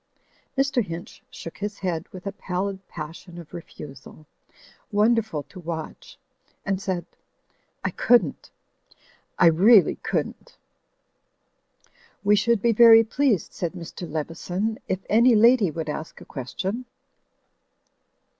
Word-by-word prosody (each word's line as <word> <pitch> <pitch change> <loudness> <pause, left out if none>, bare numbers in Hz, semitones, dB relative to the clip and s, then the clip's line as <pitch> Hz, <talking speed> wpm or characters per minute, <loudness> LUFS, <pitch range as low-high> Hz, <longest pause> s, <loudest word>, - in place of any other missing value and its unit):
Mr. 270 -3 +2
Hinch 170 -2 -8
shook 165 - -10
his 205 0 -4
head 175 -3 -3
with 185 0 -10
a 200 - -2
pallid 190 0 -3
passion 165 +2 -9
of 170 -1 -11
refusal, 150 -3 -11 0.7
wonderful 215 -6 +2
to 145 +6 -13
watch, 165 -2 -7 0.5
and 195 -1 -1
said, 185 -4 -2 0.8
"I - - -1
couldn't! 225 - +2 0.9
I - - +5
really 190 +6 +6
couldn't!" - - -4 1.7
"We 205 0 +5
should 230 0 +1
be 235 - +4
very 225 0 +8
pleased," 230 - 0
said 175 -1 -3
Mr. 175 -1 -8
Leveson, 175 +7 -3
"if 190 0 -3
any 235 +3 +5
lady 230 -2 +5
would 160 0 -5
ask 155 +1 -6
a - - -13
question." 190 - -5
190 Hz, 115 wpm, -24 LUFS, 165-220 Hz, 1.7 s, very